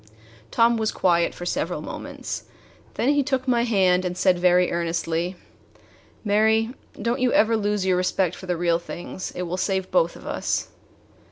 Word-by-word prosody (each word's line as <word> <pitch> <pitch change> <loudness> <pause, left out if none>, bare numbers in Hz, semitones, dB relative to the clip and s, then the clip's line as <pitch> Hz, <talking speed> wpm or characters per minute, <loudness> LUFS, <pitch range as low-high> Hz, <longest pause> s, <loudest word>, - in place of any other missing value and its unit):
Tom 235 0 +3
was 220 -1 0
quiet 170 -2 +2
for 175 - -7
several - - -2
moments; - - -6 0.5
then 245 - +1
he 290 0 +3
took 265 -1 -1
my 240 -2 +2
hand 185 -5 +3
and 180 -1 -3
said 180 -1 +3
very 180 0 +4
earnestly: 170 +1 -1 0.9
"Mary, 220 +2 +3 0.3
don't 235 +5 -1
you 250 -1 +2
ever 225 +1 +4
lose 205 -2 0
your 185 -1 +2
respect 180 -1 0
for 185 - -10
the 180 -1 -1
real 170 0 +2
things. 175 +2 -7
It 180 - -3
will 180 +1 -3
save 190 0 -1
both - - +2
of - - -13
us." - - -2
190 Hz, 170 wpm, -24 LUFS, 180-225 Hz, 0.9 s, very